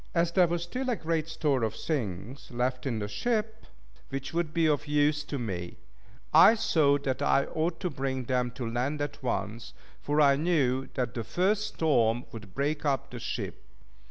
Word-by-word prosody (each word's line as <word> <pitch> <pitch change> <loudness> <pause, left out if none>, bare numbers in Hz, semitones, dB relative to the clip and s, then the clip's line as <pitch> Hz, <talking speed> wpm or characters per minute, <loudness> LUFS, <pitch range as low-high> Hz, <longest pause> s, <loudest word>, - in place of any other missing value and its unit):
As 170 0 +2
there 180 -1 +5
was 170 0 -1
still 255 +9 -3
a 245 - +2
great 160 -3 -1
store 150 -5 0
of 110 -2 -1
things 120 - -4
left 125 +2 -1
in 120 -4 -1
the 105 -1 -3
ship, 220 - -2 0.4
which 135 +2 -5
would 170 -2 0
be 165 0 +2
of 150 -1 +1
use 150 0 +2
to 145 - -4
me, 90 -8 -4 0.6
I 165 +8 +8
thought 145 -9 +2
that 130 -2 -1
I 140 - +3
ought 160 +2 -2
to 180 - 0
bring 130 -1 -2
them 125 0 0
to 125 -4 -4
land 125 +6 -1
at 145 0 -4
once; 115 -2 -3 0.3
for 145 +1 0
I 140 -2 +6
knew 135 -5 +1
that 125 -3 -1
the 115 - -3
first 200 - +1
storm 120 -6 +2
would 105 -4 -10
break 145 +2 -1
up 140 -3 0
the - - -6
ship. - - -5
140 Hz, 185 wpm, -29 LUFS, 125-160 Hz, 0.6 s, I